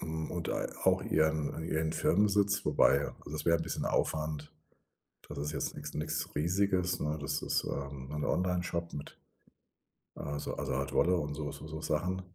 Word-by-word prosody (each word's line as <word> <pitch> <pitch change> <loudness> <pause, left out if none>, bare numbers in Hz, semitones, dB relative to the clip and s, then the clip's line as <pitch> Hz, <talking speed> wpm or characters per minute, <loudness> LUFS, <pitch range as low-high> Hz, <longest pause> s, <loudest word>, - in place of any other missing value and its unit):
Hm, 80 0 -3
und 85 -2 -3
ei - - -1 0.2
auch - - +4
ihren 80 0 +1
ihren 80 -1 0
Firmensitz, 100 +1 +3
wobei, 70 +1 +4 0.2
das 75 0 -3
wär 85 0 +6
'n - - -3
bisschen - - -2
Aufwand. 75 -1 0 0.7
Da - - -9
das 70 - -3
ist - - -2
jetzt - - -2
nix 75 - -6
nix 75 +1 -1
Riesiges, 90 +2 +2
ne? 75 +1 0
Das 70 - -1
ist, - - +1
ähm, 70 -1 -4
'n 75 -1 -2
Onlineshop 90 -1 0
mit 70 0 -7 1.0
also 75 0 -4
also 65 - -2
Art 70 +1 -1
Wolle 90 +1 +4
und 75 -3 -2
so 75 0 -3
so - - -9
so 80 0 -5
Sachen. 90 +4 0
80 Hz, 175 wpm, -32 LUFS, 75-90 Hz, 1.0 s, wär